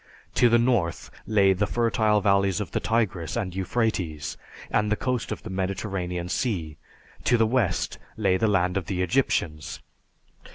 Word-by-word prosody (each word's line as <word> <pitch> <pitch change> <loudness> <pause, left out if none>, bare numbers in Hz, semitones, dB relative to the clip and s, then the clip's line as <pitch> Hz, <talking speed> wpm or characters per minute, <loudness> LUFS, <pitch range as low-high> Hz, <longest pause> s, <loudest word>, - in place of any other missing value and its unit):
To 120 - +4
the 120 - +5
north 115 -9 0 0.2
lay 100 -3 +4
the 100 +2 0
fertile 110 -2 +2
valleys 100 -1 +2
of 105 -6 -4
the - - 0
Tigris 100 -6 -1
and 95 -6 -2
Euphrates 95 -6 -1 0.4
and 105 0 +1
the - - +4
coast 125 0 -2
of - - -5
the - - -7
Mediterranean 95 -2 -3
Sea; 90 - -2 0.5
to 120 - +3
the 115 - +4
west 115 -4 0 0.2
lay 100 -4 +2
the 110 +4 +2
land 90 -2 +2
of 90 -4 -3
the 90 -1 -1
Egyptians. 85 - 0
100 Hz, 160 wpm, -26 LUFS, 90-115 Hz, 0.5 s, the